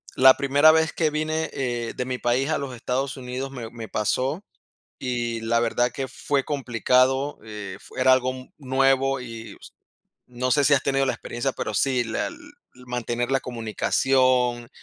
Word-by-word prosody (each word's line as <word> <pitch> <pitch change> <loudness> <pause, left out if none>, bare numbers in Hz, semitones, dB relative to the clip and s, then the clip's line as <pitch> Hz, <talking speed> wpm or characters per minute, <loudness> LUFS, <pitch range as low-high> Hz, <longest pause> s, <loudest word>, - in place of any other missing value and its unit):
La 130 0 +7
primera 140 +3 +5
vez 160 0 +2
que 160 -2 +1
vine, 155 +1 -1
eh, 120 -3 -3
de 125 - -2
mi 130 0 -3
país 125 +4 0
a 160 - +1
los 135 -3 -5
Estados 130 +3 -2
Unidos 130 +1 -5
me 120 -4 -7
me 115 -1 -8
pasó, 130 - -1 0.6
y 120 -2 -2
la 115 +1 +1
verdad 120 +1 +1
que 135 - -4
fue 140 +1 -1
complicado, 130 +1 +1
eh, 105 -3 -7
fu - - -13
era 130 0 +5
algo 130 0 +1 0.2
nuevo, 135 0 +2
y 115 -2 -8
s - - -13 0.6
no 125 +1 -2
sé 145 +2 +3
si 140 +2 +6
has 135 - +1
tenido 135 0 +1
la - - +1
experiencia, 120 +3 -3
pero 110 - -4
sí, 125 +2 +1
la 115 - -2 0.4
mantener 120 -1 -3
la 135 0 +2
comunicación, 125 +1 +1
130 Hz, 170 wpm, -24 LUFS, 120-135 Hz, 0.6 s, La